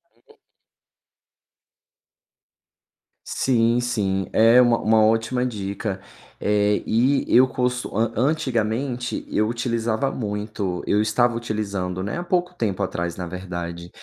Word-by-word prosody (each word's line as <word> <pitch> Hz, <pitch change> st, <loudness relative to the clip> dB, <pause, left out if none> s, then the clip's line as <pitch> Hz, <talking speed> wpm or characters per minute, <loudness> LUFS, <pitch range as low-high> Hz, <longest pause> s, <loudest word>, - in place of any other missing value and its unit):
Uhum. 445 Hz, -, -25 dB, 2.9 s
Sim, 115 Hz, -1 st, +2 dB
sim. 100 Hz, -6 st, -1 dB
É 115 Hz, +3 st, +6 dB
uma 120 Hz, -1 st, +4 dB
uma 110 Hz, 0 st, +3 dB
ótima 115 Hz, +3 st, +1 dB
dica. 100 Hz, -3 st, -3 dB, 0.4 s
Eh, 105 Hz, 0 st, +1 dB
e 130 Hz, +5 st, +2 dB
eu 130 Hz, +2 st, +6 dB
cost 125 Hz, -1 st, -1 dB
an 110 Hz, +2 st, 0 dB
antigamente 125 Hz, -2 st, -1 dB
eu 110 Hz, +1 st, +1 dB
utilizava 115 Hz, +1 st, -1 dB
muito 105 Hz, -4 st, -3 dB
eu 105 Hz, -, +2 dB
estava 120 Hz, +3 st, +2 dB
utilizando, 100 Hz, -5 st, -3 dB
né, 105 Hz, -, -3 dB
há -, -, -3 dB
pouco 180 Hz, 0 st, 0 dB
tempo 100 Hz, -, -2 dB
atrás 85 Hz, -2 st, -3 dB
na 90 Hz, -, -5 dB
verdade, 85 Hz, -1 st, -6 dB
110 Hz, 115 wpm, -23 LUFS, 100-125 Hz, 2.9 s, É